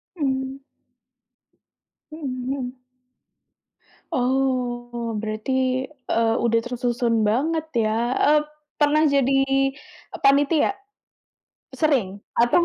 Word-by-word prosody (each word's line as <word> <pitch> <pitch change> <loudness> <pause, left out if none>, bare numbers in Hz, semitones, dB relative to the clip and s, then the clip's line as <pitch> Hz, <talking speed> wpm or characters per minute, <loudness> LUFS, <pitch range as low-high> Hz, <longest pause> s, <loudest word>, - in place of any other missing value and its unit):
Mmm. 265 -3 -2 1.5
Mhm 310 -2 -6 0.2
mhm. 260 -1 -4 1.3
Oh, 245 -2 -1
berarti, 255 +4 -1 0.2
eee, 225 0 +2
udah 230 -1 +2
tersusun 240 -2 0
banget 310 +9 0
ya 220 -1 +2 0.4
ep 300 - +3 0.4
pernah 300 +1 +4
jadi, 275 -2 +3
eee, 270 +1 -3
panitia? 285 +4 +4 1.1
Sering? 255 -12 +1 0.2
Atau 240 +9 +4
260 Hz, 80 wpm, -23 LUFS, 240-280 Hz, 1.5 s, pernah